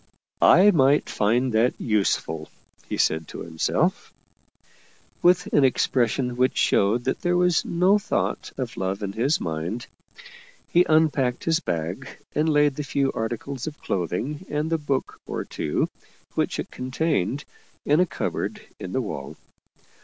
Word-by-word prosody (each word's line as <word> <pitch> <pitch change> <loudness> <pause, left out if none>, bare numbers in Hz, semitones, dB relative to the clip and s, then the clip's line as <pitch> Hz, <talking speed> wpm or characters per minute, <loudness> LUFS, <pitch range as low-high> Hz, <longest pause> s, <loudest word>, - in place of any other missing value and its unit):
" - - -43 0.2
I 200 +3 +7
might 140 -3 +3
find 120 +4 +1
that 115 +3 +2
useful," 95 -7 0 0.4
he - - -2
said 80 0 +1
to - - -8
himself, 80 -1 -1 1.1
with 180 +1 +4
an 145 - +5
expression 125 -1 +1
which 130 0 +2
showed 105 +5 +2
that 130 - -2
there 175 0 +1
was 180 -1 +3
no 185 +4 +3
thought - - -2
of - - -4
love 95 +2 -2
in 100 - -2
his 130 +8 +1
mind. 85 +9 -3 0.8
He 175 +1 +3
unpacked 150 -6 +2
his 165 0 +2
bag, 90 - -3 0.3
and 155 +2 +1
laid 145 -2 +3
the 150 - -2
few 140 -1 0
articles 120 +4 -4
of 155 -1 -7
cloth 90 -3 -2
ing 145 - -3
and 150 +2 -2
the 165 - +1
book 140 -3 -2
or - - -4
two 75 - -1 0.5
which - - -1
it - - -5
contained 130 - -1 0.4
in 150 +3 +3
a 180 - +4
cupboard - - -3 0.2
in 90 - -6
the 130 - +1
wall. 75 - -6
130 Hz, 155 wpm, -24 LUFS, 105-150 Hz, 1.1 s, I